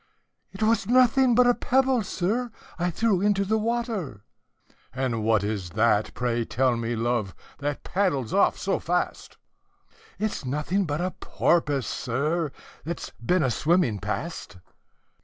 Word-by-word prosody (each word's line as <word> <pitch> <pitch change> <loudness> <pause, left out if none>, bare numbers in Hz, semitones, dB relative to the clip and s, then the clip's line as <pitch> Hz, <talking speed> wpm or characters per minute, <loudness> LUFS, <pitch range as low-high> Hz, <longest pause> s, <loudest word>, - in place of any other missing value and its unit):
"'T 215 - +1
was 220 -3 +2
nothing 255 0 +4
but 250 +1 +6
a 245 - +5
pebble, 260 0 +2
sir, 215 +6 -1 0.3
I 175 +1 +1
threw 200 +1 +1
into 200 -1 +2
the 220 +3 +1
water." 215 - -2 0.7
"And 125 -4 -2
what 110 -2 +2
is 100 -4 -3
that, 110 -2 +3
pray 120 -1 0
tell 125 +2 +1
me, 115 0 -2
love, 115 -4 -1 0.2
that 145 0 -3
paddles 175 - 0
off - - +3
so - - -1
fast?" - - -2 0.8
"It's 210 -3 -2
nothing 150 +9 -1
but 150 +1 -2
a 185 +1 -1
porpoise, 145 -9 0
sir, 150 +5 -1 0.3
that 170 +2 -4
's - - -7
been 180 +6 +2
a 130 - +1
swimming 150 - +1
past." 105 - -5
160 Hz, 145 wpm, -26 LUFS, -, 0.8 s, but